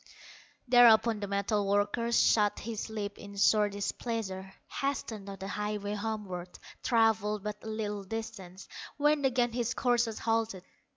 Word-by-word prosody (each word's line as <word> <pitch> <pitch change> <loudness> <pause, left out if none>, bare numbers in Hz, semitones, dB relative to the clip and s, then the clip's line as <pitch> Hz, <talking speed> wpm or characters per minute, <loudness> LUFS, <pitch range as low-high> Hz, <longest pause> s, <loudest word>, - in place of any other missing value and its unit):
Thereupon 235 -2 +6
the 205 - -4
metal 200 +1 0
worker 205 +4 +1
Shut 210 -3 +3
his 225 0 -5
lips 205 -2 -5
in 200 0 -10
sore 210 +1 +4
displeasure, 200 -1 -4 0.3
Hastened 230 -7 -3
on 195 - -7
the 190 +1 -6
highway 210 0 -3
homeward; 205 -4 -5 0.2
Travelled 215 -3 +2
but 210 -1 -4
a - - -8
little 210 -2 -3
distance, 195 -3 -7 0.3
When 295 -1 +2
again 245 -2 +2
his 240 0 -1
courser 240 -3 +1
halted. 225 -4 -1
210 Hz, 135 wpm, -30 LUFS, 200-230 Hz, 0.3 s, Thereupon